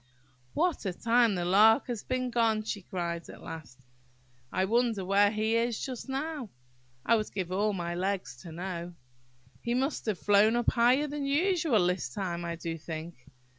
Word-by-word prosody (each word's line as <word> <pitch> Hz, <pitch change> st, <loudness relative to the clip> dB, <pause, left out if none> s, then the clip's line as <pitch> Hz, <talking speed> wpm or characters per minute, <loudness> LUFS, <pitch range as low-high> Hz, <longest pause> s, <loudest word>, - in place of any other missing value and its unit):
"What 350 Hz, -2 st, +1 dB
a 185 Hz, -, -1 dB
time 230 Hz, +1 st, +3 dB
the 175 Hz, -1 st, -2 dB
Lark 215 Hz, +7 st, +5 dB
has 240 Hz, -5 st, -4 dB
been 255 Hz, -1 st, -2 dB
gone!" 225 Hz, -2 st, +2 dB
she 210 Hz, -1 st, -4 dB
cried, 170 Hz, -2 st, -4 dB
at -, -, -11 dB
last. 140 Hz, -5 st, -9 dB, 0.7 s
"I 185 Hz, +1 st, +1 dB
wonder 225 Hz, -2 st, +1 dB
where 200 Hz, +2 st, +4 dB
he 220 Hz, +1 st, 0 dB
is 230 Hz, -1 st, +1 dB
just 260 Hz, 0 st, -5 dB
now! 275 Hz, -2 st, -3 dB, 0.6 s
I 230 Hz, -, +5 dB
would 215 Hz, -1 st, -2 dB
give 185 Hz, -3 st, -3 dB
all 205 Hz, +3 st, +1 dB
my 175 Hz, -2 st, -3 dB
legs 185 Hz, -5 st, -2 dB
to 165 Hz, +6 st, -10 dB
know! 175 Hz, 0 st, -5 dB, 0.7 s
He 235 Hz, +1 st, -1 dB
must 265 Hz, 0 st, -1 dB
have 210 Hz, -4 st, 0 dB
flown 205 Hz, +4 st, +4 dB
up 240 Hz, -1 st, +2 dB
higher 250 Hz, +4 st, +4 dB
than 290 Hz, -1 st, -3 dB
usual 305 Hz, -, +2 dB
this 180 Hz, -6 st, 0 dB
time, 175 Hz, 0 st, -3 dB
I 170 Hz, 0 st, -3 dB
do 165 Hz, 0 st, -5 dB
think! 160 Hz, -3 st, -8 dB
210 Hz, 175 wpm, -29 LUFS, 175-240 Hz, 0.7 s, Lark